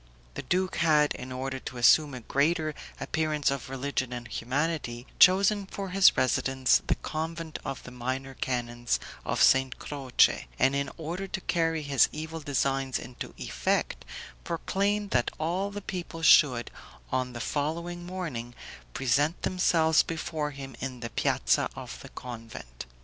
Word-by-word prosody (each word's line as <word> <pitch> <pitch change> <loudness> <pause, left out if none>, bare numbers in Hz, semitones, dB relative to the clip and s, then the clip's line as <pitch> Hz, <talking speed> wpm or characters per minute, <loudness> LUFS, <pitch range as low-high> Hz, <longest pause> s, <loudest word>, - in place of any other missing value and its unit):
The - - -5
duke 185 +1 0
had, 150 -3 +4
in 130 +1 -8
order 130 +1 -3
to 125 - -7
assume 140 +3 +5
a 125 - -7
greater 155 +5 +1 0.3
appearance 155 -3 0
of 140 -2 -4
religion 135 -1 -2
and 120 -1 -5
humanity, 130 -1 -2
chosen 195 +2 +5
for 195 0 -5
his 195 +1 +5
residence 130 0 +3
the - - +2
convent 160 +1 -5
of 135 - -5
the 125 - -10
Minor 130 +2 -4
Canons 120 -2 -1 0.2
of - - +1
St. 130 -1 +4
Croce, 135 - +2
and 135 +1 +3
in 140 -1 -1
order 175 +4 -4
to 190 - -4
carry 165 -3 0
his 140 -4 +4
evil 160 +1 -5
designs 135 -2 0
into 125 - -8
effect, - - -1 0.4
proclaimed 200 +4 -1
that 120 -1 +2
all 180 +5 -1
the 205 0 -6
people 175 -4 -6
should, 130 -7 +6 0.4
on 130 -1 -1
the 120 - -6
following 170 +7 -2
morning, 160 -10 -5 0.4
present 145 +6 +1
themselves 165 -3 +3
before 160 -2 -3
him 135 -2 -8
in 130 -2 -5
the 115 -2 -5
piazza - - +1
of - - -8
the - - -10
convent. 115 - -9
145 Hz, 150 wpm, -28 LUFS, 130-165 Hz, 0.4 s, should